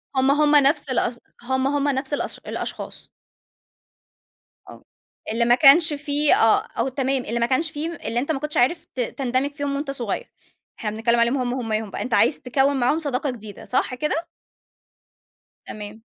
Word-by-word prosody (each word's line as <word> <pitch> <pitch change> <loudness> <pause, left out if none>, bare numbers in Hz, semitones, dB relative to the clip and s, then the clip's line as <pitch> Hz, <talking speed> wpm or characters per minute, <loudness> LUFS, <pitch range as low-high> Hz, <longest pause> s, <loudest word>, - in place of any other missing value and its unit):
هم، 265 +1 +3
هم، 295 +1 +4
نَفْس 290 0 +3
الأس 240 -1 -1 0.2
هم 260 +1 0
هم 285 0 0
نَفْس 270 +1 -1
الأش - - -2
الأشخاص. - - -6 1.6
آه. - - -13 0.5
اللي 235 +1 +1
ما 240 +1 +5
كانش 305 +4 +6
في 290 +1 +1
آه، 225 -1 +2
وتمام، 265 -1 -1
اللي 235 +1 -2
ما 235 - +3
كانش 285 +6 0
في 295 0 -4 0.2
اللي 235 - 0
أنت 285 +5 -1
ما 270 - -1
كنتش 300 +1 -3
عارف 320 +7 +2
ت 255 - -6
تندمج 255 +3 -1
فيهم 285 -1 -3
وأنت 280 0 -3
صغير. 265 - -4 0.5
إحنا 215 - -2
بنتكلم 235 +2 +1
عليهم 235 +4 +2
هم 250 -1 -1
هُماهم 220 -4 -2
بَقى، - - -5
أنت 250 - -3
عايز 280 - +4
تكوِّن 270 +2 +1
معاهم 255 +6 +2
صداقة 285 -2 -2
جديدة، 215 -4 -10
صح 255 0 0
كده؟ 305 +5 -2 1.4
تمام. 210 +1 -8
265 Hz, 165 wpm, -23 LUFS, 240-290 Hz, 1.6 s, كانش